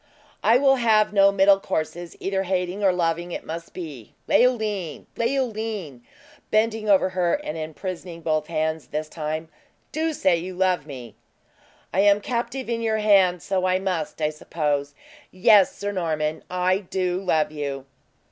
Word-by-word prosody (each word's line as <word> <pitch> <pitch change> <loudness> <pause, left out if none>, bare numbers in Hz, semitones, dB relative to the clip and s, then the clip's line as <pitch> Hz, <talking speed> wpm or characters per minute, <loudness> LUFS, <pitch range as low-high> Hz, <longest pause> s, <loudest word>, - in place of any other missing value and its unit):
"I 225 +3 +6
will 270 0 +4
have 220 -3 +3
no 200 -1 +6
middle 195 0 +5
courses 170 -1 -4
either 195 0 -1
hating 185 +1 -2
or 195 - +5
loving 170 0 -1
it - - -5
must 165 +1 -6
be! 150 - -9
Leoline! 210 - +1
Leoline!" 220 - -2 0.5
(bending 215 0 +1
over 190 -1 +4
her, 180 -2 +1
and 290 - -5
imprisoning 170 +2 -6
both 155 -1 0
hands 160 -1 -2
this 155 +1 -3
time) 155 0 -4 0.4
"do 320 +1 -1
say 185 - +2
you 180 +2 -6
love 180 -5 +1
me!" 125 -6 -9 0.8
"I 190 - +1
am 200 +1 +5
captive 240 +4 -3
in 230 -1 -2
your 220 -1 +1
hands, 195 -5 +4
so 185 -1 0
I 185 0 +2
must, 180 -5 -3
I 150 - +2
suppose. 145 -2 -2 0.3
Yes, 195 +1 +4
Sir 205 0 -3
Norman, 160 -4 -2
I 180 +1 +1
do 185 -1 -2
love 155 -5 +1
you!" 140 -3 -4
185 Hz, 155 wpm, -24 LUFS, 160-205 Hz, 0.8 s, I